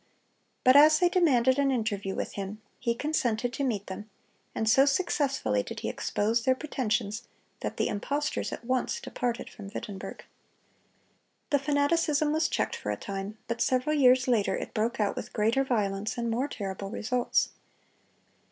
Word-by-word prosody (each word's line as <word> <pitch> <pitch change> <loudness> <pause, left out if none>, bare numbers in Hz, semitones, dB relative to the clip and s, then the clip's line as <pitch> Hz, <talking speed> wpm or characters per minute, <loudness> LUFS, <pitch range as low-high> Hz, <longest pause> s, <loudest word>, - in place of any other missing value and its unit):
But 255 +1 +6
as 305 +2 +8
they 355 +2 +4
demanded 265 -8 +3
an 280 -1 +3
interview 210 -6 -1
with - - -3
him, 200 +1 -5 0.2
he 235 -1 0
consented 245 -4 0
to 280 - -2
meet 215 -7 -1
them; 205 +3 -7 0.5
and 220 - -1
so 265 +5 +6
successfully 275 - +1
did - - -7
he - - -2
expose 225 +3 0
their 260 +1 +3
pretensions, 230 -5 -2 0.3
that - - -4
the - - +1
impostors 285 +8 -2
at - - -7
once 255 - 0
departed 245 - -3
from 205 -4 -10
Wittenberg. 205 -2 -7 1.3
The 285 - +4
fanaticism 295 +1 +2
was 315 +1 +2
checked - - -1
for - - -5
a - - -1
time; 200 +2 -5
but 235 0 -3
several 260 +4 +2
years 255 -2 +5
later 230 -5 +2
it - - -5
broke 230 +4 -1
out 205 -2 +1
with - - -6
greater 225 +6 +2
violence 210 -5 -1
and 235 -1 -1
more 250 +5 0
terrible 195 -6 -5
results. 240 +3 0
245 Hz, 160 wpm, -28 LUFS, 215-280 Hz, 1.3 s, as